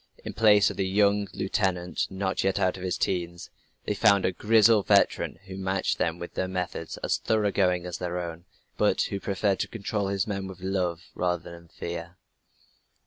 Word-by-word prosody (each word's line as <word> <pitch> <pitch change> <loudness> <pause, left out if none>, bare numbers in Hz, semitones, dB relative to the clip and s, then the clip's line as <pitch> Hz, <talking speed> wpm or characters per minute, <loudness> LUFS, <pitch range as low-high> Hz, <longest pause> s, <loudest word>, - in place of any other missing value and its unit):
In - - -5
place 105 -2 +5
of - - -10
the 95 - 0
young 100 +1 +3
lieutenant 95 -2 -1
not 95 0 -2
yet 95 +1 +1
out 95 -2 +1
of 95 - -9
his 95 -1 -2
'teens, 85 -2 -2 0.3
they - - 0
found 100 -1 +4
a - - +2
grizzled 110 0 +4
veteran 100 -1 +3
who 95 0 -8
matched 95 0 -1
them 85 0 0
with 85 0 -8
methods 90 -3 -3
as - - +1
thorough 105 -2 +1
going 90 -3 +1
as 90 - -5
their 90 -1 -3
own, 85 -1 -6 0.3
but - - +3
who 100 - -3
preferred 100 0 0
to - - -1
control 105 -2 -3
his 100 -1 0
men 100 -2 -3
by 95 - -8
love 90 -2 -2
rather 90 -1 -2
than 85 0 -12
fear. 85 +1 -7
95 Hz, 185 wpm, -27 LUFS, 90-100 Hz, 0.3 s, place